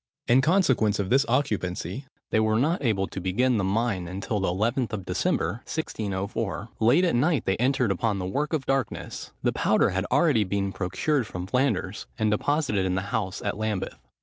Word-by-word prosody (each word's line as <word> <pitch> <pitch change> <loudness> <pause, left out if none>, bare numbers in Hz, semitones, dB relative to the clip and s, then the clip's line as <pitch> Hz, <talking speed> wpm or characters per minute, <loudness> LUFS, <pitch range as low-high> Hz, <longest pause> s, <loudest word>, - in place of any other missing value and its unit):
In 125 +3 +5
consequence 135 - +3
of 100 -2 -2
this 135 +1 +4
occupancy, 105 - -1 0.2
they 110 - +3
were 110 0 +2
not 150 +7 +1
able 105 -6 +1
to 95 - -6
begin 120 +7 +1
the 100 - 0
mine 100 -2 0
until 100 +4 -3
the 95 - 0
11th 115 +7 0
of 95 -4 -4
December, 100 +9 -1
1604. 105 - -3
Late 125 +11 +4
at 175 - +1
night 145 +5 +2
they 95 - +2
entered 125 -2 +2
upon 100 +2 0
the 90 - -3
work 140 +11 -1
of 155 -5 -1
darkness! 135 -5 -2
The - - +2
powder - - +2
had 95 0 -1
already 140 -5 +3
been 100 0 -1
procured 105 +8 -1
from 90 0 -5
Flanders, 110 -3 -1
and 110 -1 +1
deposited 105 -3 +1
in 95 -1 0
the 95 +3 -3
house 100 -5 -2
at 100 0 -2
Lambeth. 110 -3 -2
110 Hz, 185 wpm, -26 LUFS, 95-130 Hz, 0.2 s, In